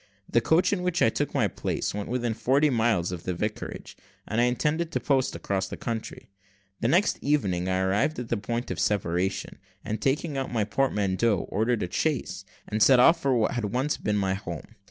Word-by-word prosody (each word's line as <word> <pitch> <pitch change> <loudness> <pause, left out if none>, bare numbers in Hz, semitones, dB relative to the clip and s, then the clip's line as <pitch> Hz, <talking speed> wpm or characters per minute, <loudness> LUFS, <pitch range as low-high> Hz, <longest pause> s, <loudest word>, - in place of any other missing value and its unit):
The 115 - +2
coach 165 - +3
in 190 - -1
which 180 -2 +1
I - - +5
took - - -2
my - - +2
place - - -3
went 105 0 -4
within 120 -2 -1
forty 140 +6 +2
miles 110 -8 +1
of 90 -2 -5
the 90 0 -3
vicarage, 105 +4 -5 0.3
and 110 +2 +1
I - - +4
intended 150 +7 0
to 130 - -1
post 130 +1 +1
across 95 -1 -2
the - - -7
country. 115 -4 -5 0.5
The - - 0
next 175 - +2
evening 95 -12 0
I 95 0 +1
arrived 100 +11 +1
at 125 -2 -5
the 115 - 0
point 115 +2 -3
of 85 - -4
separation, 95 0 -1 0.3
and 110 - -3
taking 140 +1 0
out 135 - -4
my 115 -3 +1
portmanteau, 105 -2 +1
ordered 110 +2 0
a 90 - -5
chaise, 120 - -1 0.2
and 110 +1 -2
set 130 +1 +7
off 165 +6 +6
for 135 -2 +2
what 120 +1 0
once 130 +8 -1
had - - -21
been 105 0 +1
my 95 -2 +1
home. 90 0 -7
115 Hz, 205 wpm, -26 LUFS, 100-135 Hz, 0.5 s, set